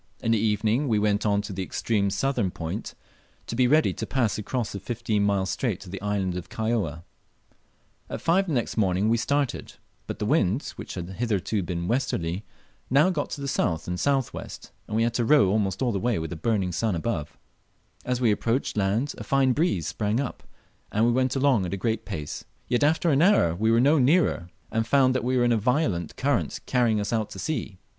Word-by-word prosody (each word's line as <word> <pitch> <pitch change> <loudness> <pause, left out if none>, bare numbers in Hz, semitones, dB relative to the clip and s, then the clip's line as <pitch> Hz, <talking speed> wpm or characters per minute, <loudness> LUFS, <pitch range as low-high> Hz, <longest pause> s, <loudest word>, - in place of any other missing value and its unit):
In 115 - +1
the 115 - +4
evening 110 +5 +1
we 110 -4 +2
went 105 0 +1
on 100 0 +2
to 100 - -6
the 95 - -4
extreme 100 +1 0
southern 120 0 0
point, 80 -2 -5 0.5
to - - -5
be 125 +1 +3
ready 155 +4 +3
to - - -5
pass 120 -6 0
across 120 +2 -2
the 100 - -5
fifteen 110 0 -1
mile 100 -2 +1
strait 105 +1 -2
to 90 - -10
the 95 - -6
island 100 -3 -1
of 90 - -6
Kaióa. 110 -8 -2 1.1
At - - -4
five 190 +4 +2
the 165 - -1
next 120 -3 -1
morning 100 0 +2
we 115 - +3
started, 140 +2 -1 0.3
but - - -4
the - - -3
wind, 105 +11 +1
which - - -8
had 90 -2 -5
hitherto 105 0 -1
been 85 -1 -3
westerly, 100 -7 -1 0.5
now 150 +8 +4
got 150 -5 -2
to 140 - -6
the 140 - -3
south 85 -11 -1
and 90 0 -3
southwest, 135 -3 -2 0.2
and 110 - -4
we 115 - +3
had 115 0 0
to 120 - +1
row 125 -4 +5
almost 100 0 0
all 125 - +1
the 100 - -1
way 120 +1 0
with 80 0 -4
a - - -5
burning 95 +1 0
sun 105 +2 0
overhead. 80 -4 -2 0.8
As 125 -1 -1
we 120 -4 +3
approached 115 +5 -1
land 105 +7 0
a - - -5
fine 135 -1 +2
breeze 135 - 0
sprang 105 +6 -1
up, 140 -3 -4 0.5
and 110 +2 +2
we 120 - +3
went 130 +2 +1
along 130 -8 +2
at 95 - -3
a - - -6
great 110 +3 -1
pace; 75 -8 -5 0.2
yet 120 +2 +1
after 160 +3 +3
an 140 +1 +3
hour 180 - +4
we 110 +6 0
were 115 +1 +4
no 145 +5 +4
nearer, 135 - +2 0.2
and 115 0 0
found 130 +1 +4
we 130 +1 0
were 120 - +3
in 120 - +3
a 115 - +3
violent 110 - 0
current 140 -2 0
carrying 120 -4 +2
us 105 +2 -2
out 110 -2 0
to - - -9
sea. 110 -4 -3
110 Hz, 215 wpm, -26 LUFS, 95-130 Hz, 1.1 s, row